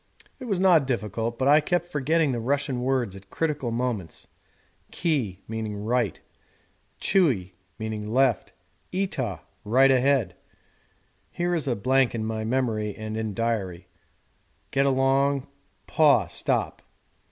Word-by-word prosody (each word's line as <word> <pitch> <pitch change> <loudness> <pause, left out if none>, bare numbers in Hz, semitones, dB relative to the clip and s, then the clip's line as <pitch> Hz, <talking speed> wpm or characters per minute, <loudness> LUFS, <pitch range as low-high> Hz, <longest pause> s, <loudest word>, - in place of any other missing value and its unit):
It 255 - -7
was 200 -6 -1
not 175 -7 +5
difficult, 115 -1 -2
but 130 - 0
I 150 +2 +6
kept 175 +2 0
forgetting 155 -1 +1
the 120 - -2
Russian 135 +1 -1
words 125 -6 0
at 100 0 -13
critical 150 -4 -2
moments: 115 -7 -3 0.6
'Ki' 125 - -1
'right'; 110 0 -2 0.8
'Tchui' 125 - +2 0.3
'left'; 110 +3 0 0.4
'Itah' 130 - -2 0.2
'right 130 +6 +4
ahead'; 130 -8 +2 0.9
[here 175 0 -1
is 160 -4 -1
a 125 - +1
blank 130 +3 +2
in 110 -1 -2
memory 110 -1 -1
and 110 0 -6
in 110 -2 -3
diary] 100 -7 -2 0.8
'get 135 0 +2
along'; 135 +1 +2 0.4
'Paw' 145 - +4
'stop.' - - -2
125 Hz, 120 wpm, -25 LUFS, 110-140 Hz, 0.9 s, I